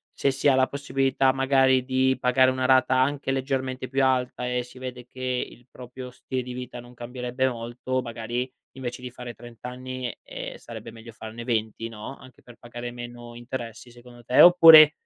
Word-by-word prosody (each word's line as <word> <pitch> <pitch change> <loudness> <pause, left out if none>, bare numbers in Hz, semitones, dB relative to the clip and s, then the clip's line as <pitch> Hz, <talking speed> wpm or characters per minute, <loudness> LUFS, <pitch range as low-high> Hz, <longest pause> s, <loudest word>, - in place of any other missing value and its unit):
se 140 - +1
si 135 +2 0
ha 135 - +6
la 130 0 +3
possibilità 135 -1 +1
magari 135 -1 +3
di 130 0 +2
pagare 130 0 +4
una 130 0 -3
rata 130 0 +4
anche 135 0 0
leggermente 130 -1 -2
più 135 +1 +1
alta 125 -1 0
e 125 0 0
si 125 +1 -15
vede 125 -1 -7
che 130 -1 -2
il 120 - -18
proprio 125 0 -9
stile 130 +1 -4
di 125 - -7
vita 125 -1 -7
non 120 +1 -13
cambierebbe 125 +2 -2
molto, 120 +2 -3
magari 120 +1 -4 0.3
invece 125 -1 -6
di 125 - -6
fare 125 -1 -8
30 120 0 -11
anni, 130 -1 -5
ehm, - - -7
sarebbe 115 -1 -9
meglio 115 0 -12
farne 110 +1 -9
20, 115 -1 -2
no, 110 +4 -8
anche 130 -1 -17
per 120 -1 -15
pagare 120 0 -7
meno 120 -1 -9
interessi 120 -1 -7
secondo 120 0 -15
te, 125 +2 +1
oppure 165 -3 +10
125 Hz, 185 wpm, -25 LUFS, 120-130 Hz, 0.3 s, oppure